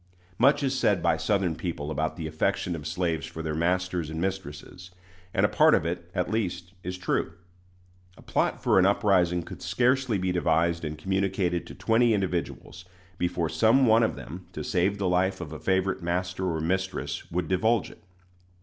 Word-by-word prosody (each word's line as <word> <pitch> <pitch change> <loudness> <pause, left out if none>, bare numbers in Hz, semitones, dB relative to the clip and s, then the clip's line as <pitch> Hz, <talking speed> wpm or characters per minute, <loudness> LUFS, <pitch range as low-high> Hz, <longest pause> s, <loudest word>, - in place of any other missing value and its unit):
Much 140 +4 +4
is 135 -1 0
said - - +2
by - - +3
Southern 95 -5 0
people 80 -4 -4
about 80 +1 -1
the 80 - -5
affection 80 +2 -1
of 75 -1 -6
slaves 80 -1 -1
for 80 0 -7
their 80 -1 -2
masters 90 0 0
and 80 0 -5
mistresses; 90 -1 -5 0.4
and - - +2
a - - +5
part - - +5
of - - 0
it, 85 0 -4
at 90 - -1
least, 90 -4 -2
is 90 +1 -5
true. 90 - -1 0.8
A - - -15
plot - - 0
for - - +4
an 95 - +5
uprising 90 -4 +2
could - - -10
scarcely 125 -2 +1
be 95 0 -1
devised 85 -1 +1
and 75 0 -4
communicated 95 0 -1
to - - -10
twenty 115 0 +3
individuals 90 -2 -3 0.4
before 85 -1 0
some 115 - +4
one 115 0 +5
of 115 - +1
them, 90 +5 -9
to - - -5
save 95 +3 +1
the 100 -2 -1
life 90 +2 +1
of 80 -3 -7
a 75 - -7
favorite 95 0 0
master 90 +2 -2
or 80 -2 -1
mistress, 95 +3 -2
would 85 -1 -2
divulge 105 +3 +1
it. - - -18
90 Hz, 185 wpm, -27 LUFS, 85-95 Hz, 0.8 s, a